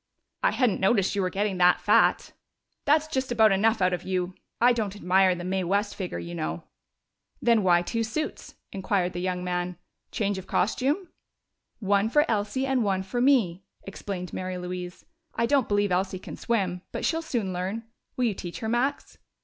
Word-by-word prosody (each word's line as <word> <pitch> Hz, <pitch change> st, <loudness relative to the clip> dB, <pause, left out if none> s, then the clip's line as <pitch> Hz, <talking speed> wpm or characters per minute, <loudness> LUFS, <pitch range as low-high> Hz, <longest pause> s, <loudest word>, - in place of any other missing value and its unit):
"I -, -, +4 dB
hadn't 245 Hz, -7 st, +1 dB
noticed 195 Hz, 0 st, +2 dB
you 200 Hz, -, +1 dB
were 185 Hz, -, 0 dB
getting 195 Hz, 0 st, -1 dB
that 180 Hz, 0 st, +5 dB
fat!" -, -, +3 dB, 0.5 s
"That's 300 Hz, +2 st, +4 dB
just 265 Hz, -4 st, -2 dB
about 220 Hz, -3 st, +5 dB
enough 215 Hz, +1 st, +2 dB
out 185 Hz, 0 st, +3 dB
of 175 Hz, -, -2 dB
you! 185 Hz, -1 st, -2 dB, 0.3 s
I 245 Hz, +1 st, +5 dB
don't 210 Hz, -4 st, -2 dB
admire 185 Hz, -1 st, +3 dB
the 175 Hz, -, -6 dB
Mae 190 Hz, +1 st, -1 dB
West 200 Hz, +3 st, 0 dB
figure, 185 Hz, -, -4 dB
you 85 Hz, 0 st, -6 dB
know." 80 Hz, -1 st, -4 dB, 0.8 s
"Then 235 Hz, -2 st, +3 dB
why 175 Hz, -2 st, +4 dB
two 230 Hz, +5 st, -1 dB
suits?" 305 Hz, +8 st, -4 dB, 0.2 s
inquired 190 Hz, -2 st, -1 dB
the 175 Hz, -, -4 dB
young 180 Hz, -1 st, -2 dB
man. 180 Hz, -1 st, -2 dB, 0.3 s
"Change 205 Hz, -4 st, -1 dB
of 190 Hz, -, -11 dB
costume?" 280 Hz, -, 0 dB, 0.7 s
"One 200 Hz, 0 st, +1 dB
for 295 Hz, +5 st, +4 dB
Elsie 215 Hz, +4 st, -1 dB
and 265 Hz, -3 st, +1 dB
one 190 Hz, -2 st, 0 dB
for 220 Hz, +6 st, -2 dB
me," 220 Hz, -10 st, +3 dB, 0.2 s
explained 195 Hz, -2 st, -6 dB
Mary 185 Hz, 0 st, -4 dB
Louise. 180 Hz, 0 st, -6 dB, 0.3 s
"I 235 Hz, -, +1 dB
don't 275 Hz, -1 st, +2 dB
believe 205 Hz, -1 st, +1 dB
Elsie 185 Hz, +1 st, 0 dB
can -, -, -9 dB
swim, 190 Hz, -6 st, -1 dB
but -, -, -3 dB
she'll 325 Hz, 0 st, +1 dB
soon 230 Hz, -, -2 dB
learn. 190 Hz, +6 st, -3 dB, 0.3 s
Will 250 Hz, -, +2 dB
you 225 Hz, -, +1 dB
teach 175 Hz, -2 st, -7 dB
her, 220 Hz, -, -2 dB
Max?" 240 Hz, +5 st, -1 dB
195 Hz, 185 wpm, -26 LUFS, 180-230 Hz, 0.8 s, that